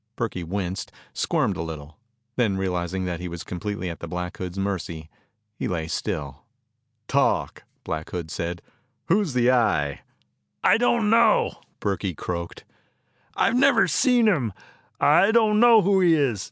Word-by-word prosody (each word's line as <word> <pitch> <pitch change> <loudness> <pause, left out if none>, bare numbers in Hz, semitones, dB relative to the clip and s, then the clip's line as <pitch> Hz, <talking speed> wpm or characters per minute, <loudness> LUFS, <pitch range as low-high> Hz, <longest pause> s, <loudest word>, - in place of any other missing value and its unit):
Burkey 110 -7 -3
winced, 95 +1 -4 0.2
squirmed - - 0
a - - -3
little. 80 -2 -7 0.4
Then 110 -6 +1
realizing 95 0 -2
that 90 -2 -3
he 90 - -5
was 85 -1 -7
completely 95 +2 -5
at 85 -2 -6
the - - -7
Black 90 0 -5
Hood's 90 0 -6
mercy, 85 -5 -4 0.4
he - - -4
lay 80 -3 -3
still. - - -4 0.7
"Talk!" - - 0 0.2
Black 80 -1 -4
Hood 85 -3 -5
said. 85 +1 -4 0.5
"Who 195 +5 +4
is 160 -11 -4
the 125 0 +4
Eye?" 100 - +1 0.6
"I - - +5
don't 235 -3 +2
know," 230 -1 +4 0.3
Burkey 95 -3 -2
croaked. 85 +1 -5 0.7
"I've 230 - +2
never 255 -2 +4
seen 245 -3 +3
him. 130 - +1 0.5
I 200 - +5
don't 220 -2 +3
know 230 -2 +7
who 195 +1 +3
he 170 -3 +5
is. 135 -9 +1
95 Hz, 155 wpm, -24 LUFS, -, 0.7 s, know